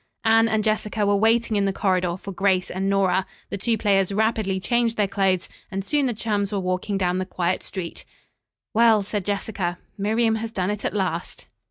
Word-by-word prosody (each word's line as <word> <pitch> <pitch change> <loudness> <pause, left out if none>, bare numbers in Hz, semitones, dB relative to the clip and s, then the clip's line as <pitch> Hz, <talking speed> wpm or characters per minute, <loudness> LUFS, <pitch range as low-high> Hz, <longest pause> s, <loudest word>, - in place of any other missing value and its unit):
Anne 225 0 +5
and 220 -1 +1
Jessica 215 0 0
were 200 0 +3
waiting 225 +2 +3
in 200 - +2
the 195 - +1
corridor 185 -3 0
for 195 - -8
Grace 190 -1 +1
and 190 +2 -1
Nora. 190 -1 +2 0.2
The - - -2
two 230 +3 +1
players 195 -2 +2
rapidly 215 -2 0
changed 230 +4 +1
their 205 -2 +2
clothes 190 -2 +1 0.2
and 195 0 -4
soon 290 +1 +1
the 245 - 0
chums 205 -2 -1
were 205 - -1
walking 185 +2 -1
down 180 -1 0
the - - 0
quiet 180 -1 -1
street. 180 -4 -6 0.7
"Well," 225 -2 +5
said 205 0 -3
Jessica, 195 -3 -2 0.2
"Miriam 220 +2 +2
has 225 0 -4
done 190 -2 -1
it 210 0 -4
at - - -2
last." 185 -3 -2
200 Hz, 195 wpm, -23 LUFS, 190-220 Hz, 0.7 s, Anne